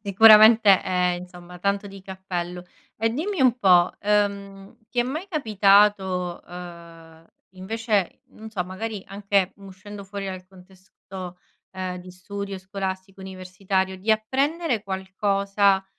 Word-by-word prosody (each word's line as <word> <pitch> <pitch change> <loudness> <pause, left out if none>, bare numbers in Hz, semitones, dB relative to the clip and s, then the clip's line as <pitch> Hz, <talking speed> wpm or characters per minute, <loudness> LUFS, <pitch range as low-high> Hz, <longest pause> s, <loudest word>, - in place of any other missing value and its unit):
Sicuramente 215 0 +7
ehm, 180 -1 0
insomma 180 0 -12
tanto 200 +2 -1
di 195 0 -11
cappello. 180 -2 -6 0.3
E 225 +1 0
dimmi 335 - -3
un 250 -1 +4
po', 180 -3 +5
ehm, 200 -1 -1
ti 245 - -6
è - - +3
mai 300 +9 -4
capitato, 200 - +2
uhm, 170 -2 -12 0.3
invece, 210 0 -2
non 220 0 -12
so, 195 -5 -2
magari 195 +3 -6
anche 200 -1 0
uscendo 200 +1 -11
fuori 200 0 -6
dal 185 -1 -7
contesto, 185 -1 -12 0.3
ehm, 185 -1 -4
di 180 0 -11
studio 200 +1 -7
scolastico 190 0 -6
universitario, 190 0 -3
di 215 +4 -1
apprendere 265 - -1
qualcosa 195 +1 0
195 Hz, 125 wpm, -24 LUFS, 185-210 Hz, 0.3 s, Sicuramente